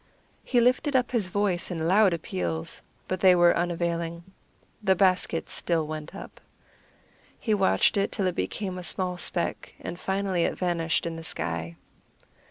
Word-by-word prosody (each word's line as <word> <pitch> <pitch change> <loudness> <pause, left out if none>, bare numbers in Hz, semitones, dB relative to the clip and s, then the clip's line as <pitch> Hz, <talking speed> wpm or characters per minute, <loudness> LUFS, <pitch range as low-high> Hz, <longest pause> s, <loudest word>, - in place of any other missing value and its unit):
He 245 - +2
lifted 255 +4 +2
up 250 -1 +2
his 225 -7 +1
voice 185 -2 0
in 165 -3 -2
loud 195 +2 +5
appeals, 90 - -3 0.3
but 185 - -2
they 185 -1 +6
were 175 0 +5
unavailing. 170 -1 -1 0.6
The 190 -2 +3
basket 185 -3 +2
still 165 -3 0
went 155 +3 -6
up. - - -10 1.0
He 220 - 0
watched 95 - +3
it 200 - +1
till 200 - -1
it 185 - +1
became 185 0 -3
a - - -7
small 180 +2 -2
speck, 175 -1 -2
and 175 - -6
finally 190 -2 0
it - - -1
vanished 170 -3 0
in 165 -1 -3
the 165 - -7
sky. 85 - -4
175 Hz, 160 wpm, -27 LUFS, 165-195 Hz, 1.0 s, they